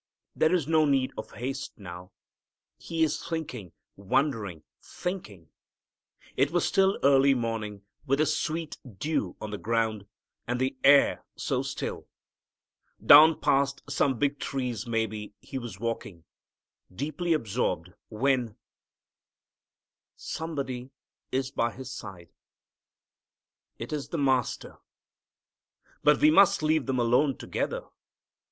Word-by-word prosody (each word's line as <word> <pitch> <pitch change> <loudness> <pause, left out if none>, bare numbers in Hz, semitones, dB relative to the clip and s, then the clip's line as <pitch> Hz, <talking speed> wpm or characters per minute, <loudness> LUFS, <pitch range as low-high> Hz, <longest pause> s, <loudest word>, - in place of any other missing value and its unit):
There 160 - +3
is 175 -6 +1
no 160 -1 +4
need 135 -3 +2
of - - -7
haste 135 +3 -5
now. 90 -3 -10 0.7
He 165 -1 -1
is 155 -2 0
thinking, 130 - -5 0.2
wondering, 100 - -1 0.2
thinking. 105 - -6 0.8
It 135 +2 +3
was 175 +2 +1
still 195 0 +3
early 135 0 +5
morning, 110 -4 -3 0.2
with 135 +1 +2
the 155 - +3
sweet 160 +1 -2 0.2
dew 145 - -2
on 105 - -6
the 105 - -5
ground, 110 -3 -1 0.4
and 125 +1 -1
the 130 +1 0
air 140 +1 +5
so - - -1
still. - - -5 1.0
Down 155 +2 +9
past 140 0 +1
some 135 -3 +1
big 145 +2 0
trees 125 -3 -3
maybe 110 -2 -2
he 135 +5 -6
was 115 -6 -8
walking, 110 -7 -4 0.7
deeply 155 - -1
absorbed, 105 - -1 0.2
when 120 -1 0 1.6
Somebody 135 -6 -5 0.4
is 130 +1 -1
by 120 -3 0
his 130 0 -8
side. 95 -9 -9 1.5
It 115 +6 -6
is 145 -2 -3
the 170 - -4
Master! 130 -4 0 1.2
But 150 0 +5
we 155 - +6
must 195 -1 +5
leave 155 -2 +2
them 130 -1 0
alone 125 +3 +2
together. - - -3
130 Hz, 120 wpm, -28 LUFS, 110-150 Hz, 1.6 s, Down